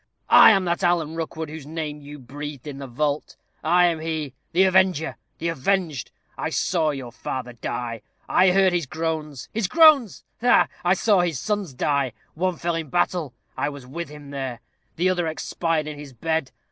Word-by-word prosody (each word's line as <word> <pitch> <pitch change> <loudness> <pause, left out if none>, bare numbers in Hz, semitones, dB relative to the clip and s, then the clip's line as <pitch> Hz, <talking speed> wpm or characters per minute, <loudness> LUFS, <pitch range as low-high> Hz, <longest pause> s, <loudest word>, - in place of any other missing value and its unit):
I - - +10
am 195 -4 +4
that 175 +2 -1
Alan 170 -3 +2
Rookwood 160 -1 -4
whose 150 -2 -8
name 150 -2 -5
you 145 +1 -10
breathed 145 +1 -8
in 140 -2 -7
the 135 - -6
vault. 145 +4 -2 0.3
I 175 +3 +5
am 170 -2 +1
he, 155 -4 -3 0.2
the 180 +3 +4
avenger 185 -4 +3 0.2
the 170 - -2
avenged. 165 -2 -1 0.3
I - - -1
saw 165 -4 +1
your 135 -5 -5
father 125 0 -5
die. 115 -1 -4 0.3
I 185 - +5
heard 190 0 +4
his 170 -5 0
groans 155 -3 -3
his 215 -3 0
groans! 305 - +5 0.2
ha, 245 +1 +5
ha! - - -21 0.2
I 180 +2 +4
saw 205 0 +3
his 170 -6 0
sons 205 -8 -2
die: 140 -2 0 0.2
one 185 +2 -1
fell 170 +1 -1
in 165 -3 -3
battle 170 -5 0 0.2
I - - -1
was 140 -3 -9
with 165 +6 -6
him 150 -1 -11
there. 130 -4 -4 0.3
The 175 +3 +1
other 175 -2 0
expired 160 0 -1
in 150 -1 -7
his 145 -2 -10
bed. 160 +3 -1
160 Hz, 185 wpm, -24 LUFS, 140-175 Hz, 0.3 s, I